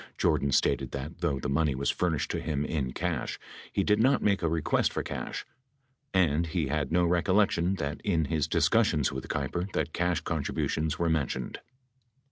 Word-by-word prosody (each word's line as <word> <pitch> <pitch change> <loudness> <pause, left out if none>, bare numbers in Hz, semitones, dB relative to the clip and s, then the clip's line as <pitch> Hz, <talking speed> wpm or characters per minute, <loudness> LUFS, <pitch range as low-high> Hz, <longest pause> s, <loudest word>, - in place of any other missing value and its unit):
Jordan 70 - +2
stated - - +2
that, 70 +5 -6
though 80 -6 0
the 75 - -3
money 70 0 +1
was 70 +2 +1
furnished 80 -6 -1
to - - -1
him 75 -2 -1
in 70 -6 -2
cash, - - -2 0.3
he 100 - +1
did 105 +2 +3
not 130 +5 +3
make 100 -2 +2
a 85 - +1
request 80 -2 +1
for - - -2
cash: - - -5 0.7
and 85 -3 +2
he 80 -3 -1
had 75 -1 -1
no 90 +1 +3
recollection 90 +1 +2
that 75 -3 -4
in 85 -6 +1
his 75 -1 0
discussions 75 -3 +2
with - - -5
Keiper 90 +3 -2
that 80 - -1
cash 90 -2 0
contributions 80 0 -1
were 85 - 0
mentioned. 70 -6 -1
80 Hz, 175 wpm, -29 LUFS, 75-90 Hz, 0.7 s, did